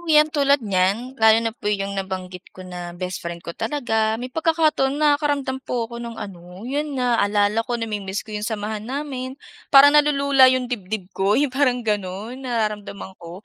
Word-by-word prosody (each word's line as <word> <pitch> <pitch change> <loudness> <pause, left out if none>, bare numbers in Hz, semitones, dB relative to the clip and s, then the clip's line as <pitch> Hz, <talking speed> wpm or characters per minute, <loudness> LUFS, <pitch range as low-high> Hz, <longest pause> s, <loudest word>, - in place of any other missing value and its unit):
oh, - - -14
yan 305 0 +5
tulad 280 -2 +3
niyan, 200 +6 0
lalo 220 0 +7
na 225 - -1
po 215 -2 -5
yung 200 -1 -1
nabanggit 185 -1 -5
ko 185 - -9
na 175 -1 -7
best 180 0 -4
friend 170 0 -7
ko 170 - -5
talaga, 220 -1 -1
may 250 +2 -7
pagkakaton 315 -3 +1
nakakaramdam 290 -3 +1
po 245 -3 -2
ako 235 +1 -8
ng 235 -1 -7
ano, 180 +1 -9
yun 285 +3 -3
naaalala 210 -4 +2
ko 240 -1 -1
na-mimiss 210 -3 -4
ko 215 - -11
yung 210 0 -3
samahan 215 -1 -3
namin. 265 -1 -4 0.3
Parang 280 +1 +8
nalulula 280 -3 +5
yung 255 -1 +1
dibdib 200 -4 -4
ko 195 +2 +1
yung 280 -2 +1
parang 255 -3 +1
ganun 210 +4 -3
nararamdaman 210 -5 -3
ko. 175 +4 -10
225 Hz, 180 wpm, -22 LUFS, 200-270 Hz, 0.3 s, Parang